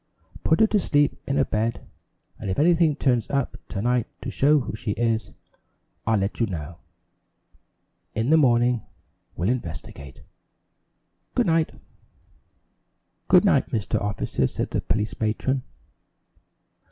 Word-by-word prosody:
Put 160 - +3
her - - +8
to 215 -1 +2
sleep 145 -5 +1
in 140 +1 0
a 135 - +3
bed 110 +2 -2 0.5
and - - -5
if 95 - -1
anything 165 -1 +4
turns 125 -6 +1
up 140 -2 -1
to 100 - -4
night 125 -1 +1 0.2
to - - -4
show 150 +2 +4
who 115 - -5
she 105 -1 -3
is, 115 -1 0 0.8
I'll 110 -1 +3
let 100 +1 -2
you 115 - +2
know. 85 -2 -6 1.4
In 115 +6 0
the - - +7
morning 120 -4 +3 0.5
we'll 90 +4 0
investigate. 80 - -5 1.1
Good - - +3
night." 165 -1 +2 1.5
"Good - - +6
night, - - +3
Mr. 110 -3 -1
Officer," 100 -9 -1
said - - -4
the - - 0
police 105 0 -2
matron. 115 +5 0
120 Hz, 135 wpm, -24 LUFS, 105-140 Hz, 1.5 s, her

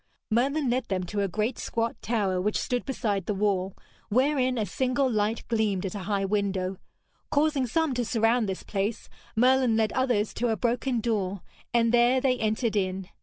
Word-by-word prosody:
Merlin 275 +6 +1
led 250 0 0
them 190 -4 -2
to 200 +3 -2
a 200 - +1
great 215 +6 -2
squat 230 0 -2
tower 200 -6 0
which 210 +3 0
stood 245 -1 -2
beside 210 -8 -1
the 210 - 0
wall, 195 -2 0 0.3
wherein 255 +2 +2
a 215 - 0
single 255 +7 0
light 215 -1 -1
gleamed 215 -5 0
at 185 - -3
a 205 - -4
high 200 -1 +1
window. 195 -2 -1 0.5
Causing 290 -3 +2
some 320 +3 +1
to 245 -1 0
surround 225 -1 +2
this 190 - -4
place, 205 +2 -3 0.3
Merlin 250 0 +4
led 220 -1 +1
others 245 -5 +1
to 240 - -1
a 220 - 0
broken 245 +1 0
door, 200 -5 -1 0.3
and 230 0 +2
there 240 +2 +5
they 255 -1 +1
entered 220 +1 0
in. 190 -1 -1
225 Hz, 180 wpm, -27 LUFS, 200-250 Hz, 0.5 s, there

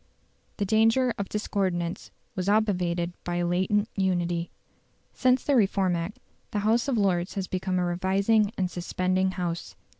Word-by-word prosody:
The 205 - 0
danger 225 +4 +3
of 200 - -3
discordance 185 -5 -2 0.3
was 185 +1 -1
obviated 180 -5 +1
by 175 - -3
a 175 0 0
latent 190 +4 +1
unity. 175 -3 0 0.6
Since 255 -1 +2
the 285 - +2
Reform 195 -5 +2
Act 170 +5 -4 0.3
the 210 - -2
House 230 +4 +2
of 265 -4 +1
Lords 185 -2 +1
has 195 -2 -2
become 185 0 -2
a 180 - +1
revising 195 +4 +2
and 185 -2 -1
suspending 185 +1 0
House. 175 -2 -4
190 Hz, 150 wpm, -27 LUFS, 175-210 Hz, 0.6 s, danger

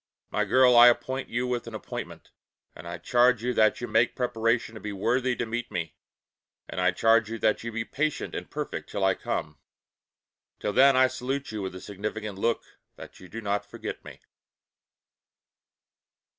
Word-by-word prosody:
My - - +1
girl 130 -1 +5
I 120 +1 +10
appoint 130 +3 +1
with - - -17
you 125 +1 0
an 115 -2 -5
appointment, 105 - -7 0.4
and 80 - -10
I 85 0 -5
charge 120 +6 +3
you 125 +1 0
that 110 0 +3
you 120 - -3
make 115 +1 +2
preparation 115 -2 0
to 110 - -10
be 105 - -4
worthy 125 +6 0
to 120 - -2
meet 120 +2 -4
me, 85 -2 -4 0.7
And - - -4
I 90 - +4
charge 115 +3 +3
you 115 - -4
that 110 0 +1
you 115 - -4
be 115 0 -3
patient 150 +2 -2
and - - -6
perfect - - -5
till 100 - -3
I 95 0 +4
come. 75 -5 -4 1.0
Till 105 - -2
then 135 0 +6
I 130 - +7
salute 130 +1 -3
you 110 -1 -4
with 95 -1 -5
a 95 - -8
significant 105 0 -5
look 115 +2 0 0.3
that - - -12
you 90 - -12
do 115 - -7
not 100 -1 -1
forget - - -7
me. - - -12
115 Hz, 185 wpm, -27 LUFS, 105-125 Hz, 1.0 s, I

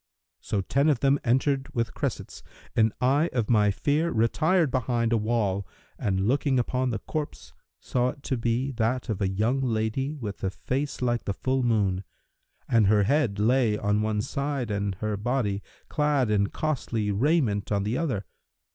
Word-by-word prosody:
So 100 - -2
ten 140 +9 +2
of 140 -6 +1
them 140 0 +3
entered 135 +2 +1
with 115 -2 -1
cressets, - - -4 0.3
and 110 -1 +4
I 140 +6 +3
of 120 -2 0
my 105 -2 +4
fear 145 +11 +1
retired 155 +7 +2
behind 120 -2 0
a - - +4
wall 105 -4 0 0.3
and 95 -1 0
looking 135 +1 +2
upon 125 +1 0
the 115 - -1
corpse, 150 +7 -5 0.3
saw 125 0 0
it 140 +2 -9
to 130 - -1
be 120 +3 0
that 120 +1 -1
of 105 -3 -2
a 95 - +2
young 110 +8 0
lady[FN#342] 130 +5 -1
with 105 -5 -6
a 95 - +1
face 130 +7 -3
like 120 -1 0
the 100 - -2
full 130 0 0
moon; 100 -6 +1 0.6
and 115 -4 +4
her 105 0 +4
head 125 -3 +1
lay 115 0 +3
on 105 +1 +1
one 105 -1 0
side 140 -4 -2
and 100 -1 -1
her 110 -1 -1
body 105 -3 -1 0.3
clad 145 -6 +1
in 100 -1 +3
costly 115 -7 -2
raiment 110 -3 +1
on 100 -1 +1
the 105 +4 -1
other. 130 -12 -2
120 Hz, 175 wpm, -26 LUFS, 105-135 Hz, 0.6 s, and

